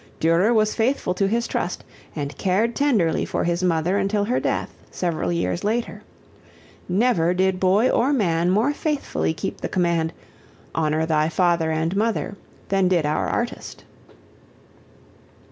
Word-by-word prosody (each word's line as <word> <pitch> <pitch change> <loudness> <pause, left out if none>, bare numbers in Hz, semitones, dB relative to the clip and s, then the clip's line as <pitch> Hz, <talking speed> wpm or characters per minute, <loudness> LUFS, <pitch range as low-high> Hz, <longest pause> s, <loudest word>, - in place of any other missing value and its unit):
Durer 170 +7 +3
was 215 -2 +2
faithful 230 -5 0
to 195 +1 0
his 235 +3 0
trust 175 - -3 0.3
and 145 -2 -4
cared 205 - 0
tenderly 220 - +2
for - - -2
his 170 +1 0
mother 180 +2 +1
until 200 +1 0
her 240 +5 0
death, - - -2 0.2
several 175 -2 -2
years 170 +1 -1
later. 230 +3 -2 0.9
Never 180 -4 +2
did 190 0 +1
boy 195 +6 +3
or 255 +3 +2
man 175 - +1
more 220 +10 +2
faithfully 275 - -2
keep - - -5
the - - -3
command, 170 -3 0 0.6
"Honor 155 0 0
thy 155 -1 +1
father 170 -2 +1
and 160 +3 -1
mother," 215 -1 -1 0.3
than 195 -1 +2
did 175 -4 +2
our 150 +1 0
artist. 240 +1 -4
185 Hz, 145 wpm, -23 LUFS, 165-220 Hz, 0.9 s, Durer